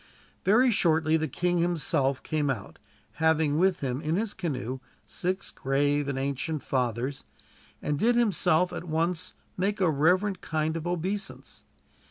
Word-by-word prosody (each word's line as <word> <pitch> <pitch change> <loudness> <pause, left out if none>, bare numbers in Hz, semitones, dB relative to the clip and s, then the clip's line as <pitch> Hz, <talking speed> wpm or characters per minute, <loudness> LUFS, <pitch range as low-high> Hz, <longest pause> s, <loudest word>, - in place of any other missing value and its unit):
Very 240 +6 +5
shortly 160 -6 +3
the 160 0 +1
king 175 +5 0
himself 150 -6 0
came 150 -2 0
out, 115 -8 -4 0.4
having 160 -2 +3
with 190 0 +2
him 130 0 -2
in 155 +2 0
his 210 +2 -1
canoe 130 - -3 0.3
six 185 +2 -2
grave 145 +2 0
and 140 -1 -2
ancient 140 +3 -2
fathers, 125 +1 -1 0.6
and 145 -1 -1
did 235 +5 +3
himself 180 -6 +3
at - - -5
once 165 +2 -1 0.2
make 200 +3 0
a 180 -4 +3
reverent 180 +6 +2
kind 155 0 -1
of 165 +1 -4
obeisance. 185 +4 -4
160 Hz, 145 wpm, -28 LUFS, 145-180 Hz, 0.6 s, Very